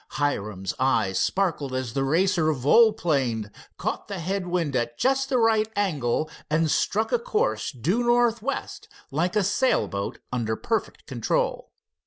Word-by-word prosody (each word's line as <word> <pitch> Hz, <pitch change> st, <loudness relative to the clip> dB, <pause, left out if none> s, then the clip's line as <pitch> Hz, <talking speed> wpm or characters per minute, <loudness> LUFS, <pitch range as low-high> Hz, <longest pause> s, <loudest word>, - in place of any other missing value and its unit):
Hiram's 105 Hz, -10 st, -2 dB
eyes 125 Hz, -8 st, +2 dB
sparkled 165 Hz, -9 st, 0 dB
as 130 Hz, -3 st, -3 dB
the 135 Hz, 0 st, 0 dB
Racer 165 Hz, +2 st, +2 dB
volplaned, 140 Hz, -, +2 dB, 0.3 s
caught -, -, -3 dB
the 200 Hz, -2 st, -5 dB
head 185 Hz, +2 st, -2 dB
wind 170 Hz, -6 st, -1 dB
at 120 Hz, -1 st, -1 dB
just 270 Hz, +1 st, +1 dB
the 260 Hz, -, +2 dB
right 220 Hz, -2 st, +2 dB
angle, 155 Hz, -8 st, 0 dB, 0.2 s
and 155 Hz, 0 st, +2 dB
struck 220 Hz, +2 st, +1 dB
a 485 Hz, -, +2 dB
course 470 Hz, 0 st, -1 dB
due 170 Hz, -, 0 dB
northwest 240 Hz, +1 st, 0 dB, 0.2 s
like 170 Hz, +8 st, 0 dB
a 210 Hz, -, +3 dB
sail 230 Hz, +7 st, +2 dB
boat 100 Hz, -1 st, -4 dB, 0.2 s
under 110 Hz, -3 st, -1 dB
perfect 225 Hz, -, -3 dB
control. -, -, -1 dB
170 Hz, 145 wpm, -25 LUFS, -, 0.3 s, a